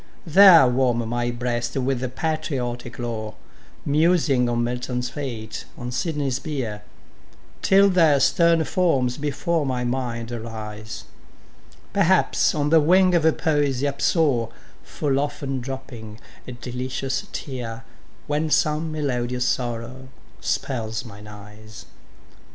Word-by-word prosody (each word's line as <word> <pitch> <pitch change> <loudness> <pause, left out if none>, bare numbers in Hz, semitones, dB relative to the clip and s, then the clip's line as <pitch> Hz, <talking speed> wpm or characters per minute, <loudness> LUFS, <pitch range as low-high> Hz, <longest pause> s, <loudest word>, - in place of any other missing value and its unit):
There 175 -2 +8
warm 125 -2 +1
my 120 +1 -1
breast 120 0 -2
with 130 -1 -2
patriotic 130 -7 -3
lore, 110 -3 -4 0.5
Musing 150 -4 +2
on 120 0 0
Milton's 125 0 -3
fate 120 -6 -6
on 125 0 -5
Sydney's 135 0 -1
bier 125 -10 -4 0.8
Till 195 +1 +5
their 165 -7 +4
stern 165 +3 +3
forms 135 -10 +1
before 150 +3 -1
my 130 -3 -2
mind 120 -2 -3
arise: 110 -1 -7 0.9
Perhaps 190 -4 +3
on 145 -1 0
the 165 - +7
wing 180 +4 +4
of 170 - +4 0.2
Poesy 145 -4 +1
upsoar, 140 -4 +1 0.3
Full 135 - -1
often 140 -2 -3
dropping 120 -4 -8 0.3
a 125 - -6
delicious 125 +2 -4
tear, 115 -4 -6 0.4
When 150 +2 -1
some 155 +1 +1
melodious 125 -4 -1
sorrow 120 +1 -3 0.3
spells 115 -2 -2
mine 105 -2 -11
eyes. 105 +1 -12
130 Hz, 110 wpm, -23 LUFS, 120-150 Hz, 0.9 s, There